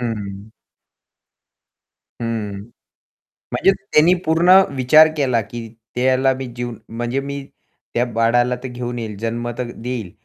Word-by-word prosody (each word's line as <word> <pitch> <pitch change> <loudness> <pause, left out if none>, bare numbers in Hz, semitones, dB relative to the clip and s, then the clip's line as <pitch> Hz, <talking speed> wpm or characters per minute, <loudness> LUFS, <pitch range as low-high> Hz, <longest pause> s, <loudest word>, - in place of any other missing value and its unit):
हं. 105 -3 -5 1.7
हं. 105 -4 -3 0.9
म्हणजे 195 - +3 0.2
त्यानी 160 +4 +6
पूर्ण 165 +3 +4 0.2
विचार 150 +5 +6
केला, 130 -5 +2
की 115 +2 -7 0.3
त्याला 130 +1 +3
मी 130 0 -5
जीव 120 0 -4 0.2
म्हणजे 120 +3 -2
मी 140 0 -5 0.5
त्या 120 - +2
बाळाला 120 +1 +2
तर 130 - -3
घेऊन 120 0 -5
येईल, 110 -3 -5
जन्म 115 +2 -3
तर 120 -1 -3
देईल. 115 -5 -5
120 Hz, 125 wpm, -20 LUFS, 115-130 Hz, 1.7 s, त्यानी